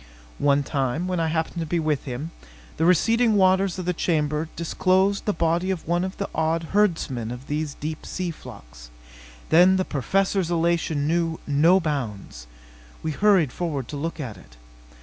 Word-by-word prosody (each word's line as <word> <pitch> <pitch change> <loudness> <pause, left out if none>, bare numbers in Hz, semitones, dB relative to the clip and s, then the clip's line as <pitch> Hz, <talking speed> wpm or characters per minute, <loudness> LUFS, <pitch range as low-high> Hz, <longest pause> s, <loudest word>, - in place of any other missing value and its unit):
One 145 0 +3
time, 140 +4 -1
when 180 -2 -1
I 165 - +1
happened 160 +2 -2
to 165 - -2
be 170 +2 0
with 155 -3 -1
him, 135 +6 -5 0.5
the 160 - +1
receding 225 +6 +3
waters 190 -1 +3
of 185 - -4
the 180 - 0
chamber 155 -2 -1
disclosed 185 +3 +1
the 210 - +2
body 170 +1 0
of 185 -5 -3
one 175 +1 +1
of 190 +1 -5
the 200 - -3
odd 160 +1 -1
herdsmen 160 - +1
of 125 +2 -7
these 150 0 -3
deep 155 +1 -5
sea 180 -2 -3
flocks. - - -13 0.6
Then 180 +3 +6
the 185 - 0
Professor's 190 - 0
elation 165 -3 0
knew 165 +1 0
no 160 +6 +4
bounds. 110 - -4 0.6
We 160 - -1
hurried 185 -4 +3
forward 145 -7 -3
to 150 - -5
look 165 +4 -4
at 120 -9 -5
it. - - -18
165 Hz, 170 wpm, -24 LUFS, 145-185 Hz, 0.6 s, Then